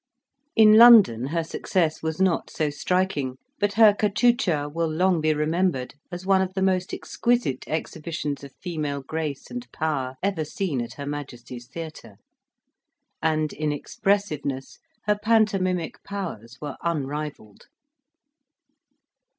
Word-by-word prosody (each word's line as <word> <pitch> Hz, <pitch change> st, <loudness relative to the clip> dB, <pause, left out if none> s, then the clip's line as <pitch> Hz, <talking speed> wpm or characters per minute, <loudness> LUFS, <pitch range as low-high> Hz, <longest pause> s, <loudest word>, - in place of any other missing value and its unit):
In 215 Hz, -1 st, +7 dB
London 215 Hz, -, +8 dB
her 165 Hz, +3 st, -1 dB
success 160 Hz, -1 st, -1 dB
was 160 Hz, +1 st, -3 dB
not 190 Hz, -3 st, +1 dB
so 155 Hz, -2 st, -1 dB
striking; 150 Hz, -5 st, -1 dB, 0.2 s
but 205 Hz, 0 st, +1 dB
her 220 Hz, -1 st, +7 dB
cachucha 205 Hz, -7 st, +2 dB
will 165 Hz, +2 st, -2 dB
long 180 Hz, +1 st, +2 dB
be 155 Hz, 0 st, +2 dB
remembered, 155 Hz, -2 st, 0 dB, 0.2 s
as 175 Hz, +1 st, -6 dB
one 190 Hz, -1 st, +4 dB
of 185 Hz, 0 st, -3 dB
the 190 Hz, -, -1 dB
most 185 Hz, -1 st, +1 dB
exquisite 235 Hz, -, -1 dB
exhibitions 155 Hz, -2 st, -4 dB
of 140 Hz, -, -9 dB
female 150 Hz, -6 st, -4 dB
grace 155 Hz, -1 st, -4 dB
and 245 Hz, 0 st, -7 dB
power 135 Hz, -5 st, -2 dB
ever 190 Hz, -5 st, 0 dB
seen 155 Hz, -3 st, -2 dB
at 120 Hz, -, -6 dB
her 140 Hz, -, -7 dB
Majesty's 125 Hz, -4 st, -7 dB
Theatre, 155 Hz, -8 st, -9 dB, 1.0 s
and 155 Hz, -1 st, 0 dB
in 150 Hz, 0 st, -1 dB
expressiveness, 150 Hz, -5 st, -2 dB, 0.3 s
her 210 Hz, 0 st, +1 dB
pantomimic 195 Hz, -6 st, +1 dB
powers 120 Hz, -, -6 dB
were 145 Hz, -2 st, -6 dB
unrivalled. 150 Hz, -8 st, -4 dB
160 Hz, 125 wpm, -25 LUFS, 145-190 Hz, 1.0 s, London